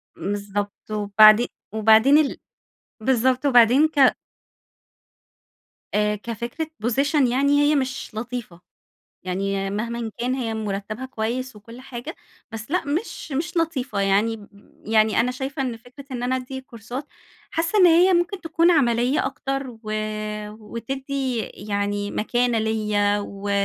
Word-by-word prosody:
بالضبط، 205 Hz, +1 st, -4 dB
وبعدين 215 Hz, +2 st, +6 dB, 0.3 s
وبعدين 220 Hz, +6 st, +6 dB
ال 305 Hz, -3 st, +1 dB, 0.7 s
بالضبط، 260 Hz, +3 st, +2 dB
وبعدين 250 Hz, +4 st, +6 dB
ك 280 Hz, -5 st, +4 dB, 1.8 s
آآ، 210 Hz, 0 st, +2 dB
كفكرة 235 Hz, +8 st, -5 dB, 0.2 s
position 275 Hz, +3 st, +2 dB
يعني 280 Hz, +3 st, +3 dB
هي 295 Hz, +1 st, +3 dB
مش 265 Hz, -1 st, -2 dB
لطيفة، 225 Hz, -6 st, -6 dB, 0.6 s
يعني 195 Hz, +1 st, -2 dB
مهمًا 230 Hz, +2 st, -3 dB
كان 250 Hz, +2 st, 0 dB
هي 230 Hz, -4 st, -2 dB
مرتبها 215 Hz, +3 st, -4 dB
كويس 245 Hz, +1 st, -3 dB
وكل 230 Hz, +4 st, -12 dB
حاجة، 260 Hz, +4 st, -7 dB, 0.4 s
بس 225 Hz, +4 st, -7 dB
لأ 360 Hz, -2 st, 0 dB
مش 305 Hz, 0 st, -4 dB
مش 305 Hz, +5 st, -3 dB
لطيفة 280 Hz, -10 st, -1 dB
يعني 205 Hz, +2 st, +1 dB, 0.4 s
يعني 220 Hz, 0 st, +3 dB
أنا 250 Hz, -, +1 dB
شايفة 270 Hz, +2 st, -4 dB
إن 245 Hz, -3 st, -3 dB
فكرة 245 Hz, +5 st, -14 dB
إن 245 Hz, -1 st, -4 dB
أنا 255 Hz, +1 st, 0 dB
أدّي 265 Hz, +1 st, -6 dB
كورسات 245 Hz, +3 st, -8 dB, 0.4 s
حاسة 335 Hz, +6 st, 0 dB
إن 365 Hz, -, +8 dB
هي 350 Hz, +3 st, +6 dB
ممكن 350 Hz, +2 st, +1 dB
تكون 335 Hz, +1 st, +2 dB
عمليّة 250 Hz, -3 st, +2 dB
أكتر، 270 Hz, -2 st, -4 dB
و 215 Hz, -, -5 dB, 0.6 s
وتدّي 255 Hz, +4 st, -4 dB, 0.2 s
يعني 205 Hz, 0 st, -2 dB
مكانة 240 Hz, +1 st, 0 dB
ليَّ 210 Hz, -2 st, +1 dB
و 200 Hz, 0 st, -5 dB
240 Hz, 125 wpm, -23 LUFS, 215-275 Hz, 1.8 s, إن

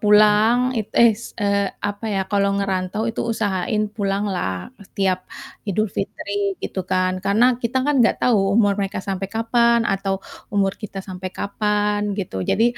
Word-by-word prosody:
pulang, 210 Hz, +2 st, +5 dB, 0.2 s
it 215 Hz, -, -2 dB
es 235 Hz, -1 st, +3 dB
eee, 200 Hz, -1 st, +1 dB
apa 205 Hz, +2 st, -3 dB
ya, 195 Hz, -, +1 dB
kalau 200 Hz, -1 st, +2 dB
ngerantau 195 Hz, +1 st, -1 dB
itu -, -, -5 dB
usahain 210 Hz, 0 st, 0 dB
pulanglah 195 Hz, -, -2 dB, 0.2 s
setiap 190 Hz, -3 st, -1 dB, 0.4 s
Idul 215 Hz, +3 st, +1 dB
Fitri, 200 Hz, 0 st, -2 dB
gitu 190 Hz, -, -3 dB
kan. 185 Hz, 0 st, +1 dB
Karena 205 Hz, +4 st, +3 dB, 0.2 s
kita 240 Hz, +2 st, 0 dB
kan 295 Hz, -, +2 dB
nggak -, -, +3 dB
tahu 235 Hz, -4 st, +4 dB, 0.2 s
umur 205 Hz, -3 st, +4 dB
mereka 195 Hz, -1 st, -2 dB
sampai 195 Hz, -1 st, -3 dB
kapan 235 Hz, +1 st, +3 dB
atau 195 Hz, 0 st, -2 dB, 0.3 s
umur 195 Hz, -1 st, +2 dB
kita 200 Hz, -2 st, -6 dB
sampai 185 Hz, 0 st, -5 dB
kapan, 210 Hz, 0 st, 0 dB, 0.2 s
gitu. 175 Hz, -, -4 dB
Jadi, 225 Hz, -, +2 dB
200 Hz, 150 wpm, -21 LUFS, 195-215 Hz, 0.4 s, pulang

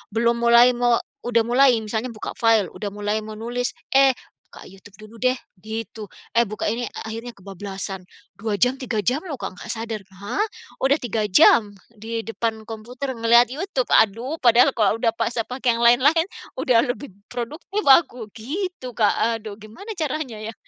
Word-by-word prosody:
belum 235 Hz, +1 st, +2 dB
mulai 235 Hz, +1 st, +6 dB
mau 240 Hz, -1 st, +2 dB, 0.2 s
udah 235 Hz, -1 st, +1 dB
mulai 250 Hz, +2 st, +4 dB
misalnya 220 Hz, +3 st, -3 dB
buka 215 Hz, -, -6 dB
file, 225 Hz, -5 st, +3 dB
udah 210 Hz, -, -6 dB
mulai 210 Hz, +1 st, -1 dB
menulis, 230 Hz, +4 st, -4 dB, 0.2 s
"Eh, 270 Hz, -1 st, +5 dB, 0.3 s
buka -, -, -13 dB
YouTube 195 Hz, +1 st, -16 dB
dulu 220 Hz, -, -15 dB
deh," 255 Hz, 0 st, +3 dB, 0.3 s
gitu. 220 Hz, 0 st, -6 dB, 0.3 s
"Eh 235 Hz, -, +5 dB
buka 215 Hz, +2 st, -5 dB
ini," 240 Hz, +1 st, -3 dB
akhirnya 230 Hz, +2 st, -7 dB
kebablasan 195 Hz, -1 st, -7 dB, 0.3 s
2 215 Hz, -1 st, -2 dB
jam 250 Hz, +7 st, +2 dB
3 245 Hz, -4 st, -3 dB
jam 255 Hz, +4 st, +1 dB
loh, 290 Hz, -, -4 dB
Kak, -, -, -6 dB
nggak -, -, -10 dB
sadar. 225 Hz, -2 st, -4 dB
Hah! 200 Hz, -, -3 dB, 0.4 s
udah 270 Hz, +2 st, +4 dB
3 225 Hz, -6 st, -2 dB
jam 205 Hz, +2 st, +5 dB, 0.2 s
di 225 Hz, +1 st, -5 dB
depan 225 Hz, -1 st, -3 dB
komputer 245 Hz, +5 st, -6 dB
ngelihat 235 Hz, +1 st, +4 dB
YouTube, 290 Hz, -4 st, -2 dB
aduh 235 Hz, +9 st, +2 dB
padahal 245 Hz, +3 st, +5 dB
kalau 215 Hz, -1 st, +2 dB
udah 230 Hz, 0 st, +1 dB
paksa 230 Hz, 0 st, -1 dB
pakai 250 Hz, -2 st, 0 dB
yang 235 Hz, -, -1 dB
lain-lain, 275 Hz, +8 st, +5 dB, 0.3 s
udah 250 Hz, -, +3 dB
lebih 260 Hz, +1 st, -5 dB, 0.2 s
produktif 315 Hz, -, -4 dB
aku 265 Hz, -4 st, +4 dB
gitu, 265 Hz, -, -5 dB
Kak, 210 Hz, -3 st, +3 dB, 0.2 s
aduh 215 Hz, -1 st, -8 dB
gimana 225 Hz, -, -10 dB
caranya 305 Hz, -, -3 dB
ya? -, -, -7 dB
235 Hz, 165 wpm, -22 LUFS, 220-255 Hz, 0.4 s, mulai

